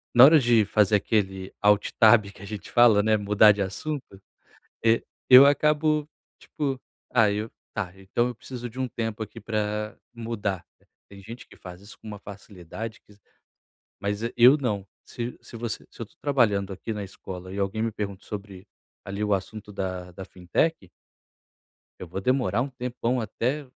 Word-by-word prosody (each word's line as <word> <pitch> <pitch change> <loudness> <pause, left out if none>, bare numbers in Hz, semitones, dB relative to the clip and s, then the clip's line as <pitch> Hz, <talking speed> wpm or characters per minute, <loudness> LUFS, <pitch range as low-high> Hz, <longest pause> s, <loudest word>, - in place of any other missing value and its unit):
na 120 - +10
hora 155 +3 +9
de 120 -4 +4
fazer 105 0 +3
aquele 95 -2 -1
alt 105 0 +3
tab 110 0 +7
que - - -17
a - - -8
gente 105 0 -8
fala, 115 -4 +6
né, 110 0 +3
mudar 105 +1 +5
de 100 0 -2
assunto, 100 +1 -5 0.6
eh, 115 0 +3 0.3
eu 130 +2 +10
acabo, 150 +1 +2 0.3
tipo 135 -4 -3 0.3
ah, 115 -4 +4
eu 105 +2 -3 0.2
tá 100 -5 -3
então 95 +5 -1
eu 125 - -5
preciso 120 +1 -8
de 125 - -12
tempo 115 -1 -4
aqui 110 +2 -8
pra 105 0 -3 0.2
mudar. 110 -6 -4 0.4
Tem 100 0 -13
gente 115 +5 -10
que - - -17
faz 90 0 -11
isso 100 - -13
com - - -16
uma 105 -1 -7
facilidade 100 +2 -9
que 105 - -20 0.9
mas 100 +1 -2
e 115 - -2
eu 125 +5 +8
não. 105 -8 -2 0.2
Se 120 0 -6
se 115 - -11
você 115 -2 -5
se - - -18
eu 115 - -4
tô - - -28
trabalhando 105 -9 +1
aqui 105 +4 -5
na 105 -1 -4
escola 95 -1 -9
e 100 - -6
alguém 100 +3 -1
me 115 0 -1
pergunta 100 -2 -5
sobre 100 -2 -8 0.4
ali 100 +1 -5
o 105 -1 +2
assunto 105 +2 -6
da 95 -2 -4
da 95 +2 -8
fintech 95 - -1 1.1
eu 90 - -7
vou 95 +3 -5
demorar 120 -3 +1
um 140 - -2
tempão 125 -1 -2
até 125 +7 -2
105 Hz, 175 wpm, -26 LUFS, 100-120 Hz, 1.1 s, na